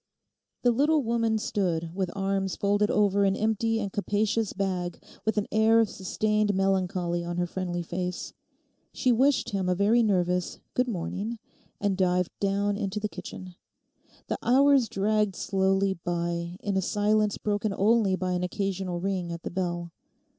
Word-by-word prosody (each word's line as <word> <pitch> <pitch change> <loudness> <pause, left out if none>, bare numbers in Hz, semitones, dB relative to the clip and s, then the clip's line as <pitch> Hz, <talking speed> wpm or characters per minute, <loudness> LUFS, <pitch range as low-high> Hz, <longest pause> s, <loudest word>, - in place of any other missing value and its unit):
The 245 - +5
little 290 +5 +3
woman 230 -1 +1
stood 170 -6 -1
with 185 -1 -1
arms 195 -1 -1
folded 205 +1 +1
over 200 -1 +3
an 195 -1 +3
empty 220 +1 0
and 200 -3 -4
capacious 210 +1 0
bag, 185 -3 -2 0.3
with 220 -1 0
an 205 - +1
air 220 +1 +4
of 225 -2 +2
sustained 210 +2 0
melancholy 185 -2 0
on 175 0 -4
her 175 - +1
friendly 175 -1 -3
face. 180 +1 -4 0.6
She 255 - +1
wished 265 +4 +2
him 190 -2 -1
a 180 - +2
very 210 +5 +4
nervous 180 -4 0
'Good 250 0 +1
morning,' 210 +2 -3 0.4
and 200 -1 +1
dived 180 -1 +1
down 200 0 0
into 200 0 -2
the 210 0 -2
kitchen. 180 +1 -9 0.7
The - - -3
hours 270 -1 +4
dragged 210 0 +1
slowly 195 0 +1
by 170 0 -3
in 200 -1 -2
a 190 - +2
silence 210 +2 +1
broken 210 0 -1
only 205 0 +3
by 185 0 -2
an 180 0 0
occasional 190 -1 -2
ring 185 -2 -2
at 170 0 -6
the - - -4
bell. 175 -2 -3
195 Hz, 160 wpm, -27 LUFS, 180-215 Hz, 0.7 s, The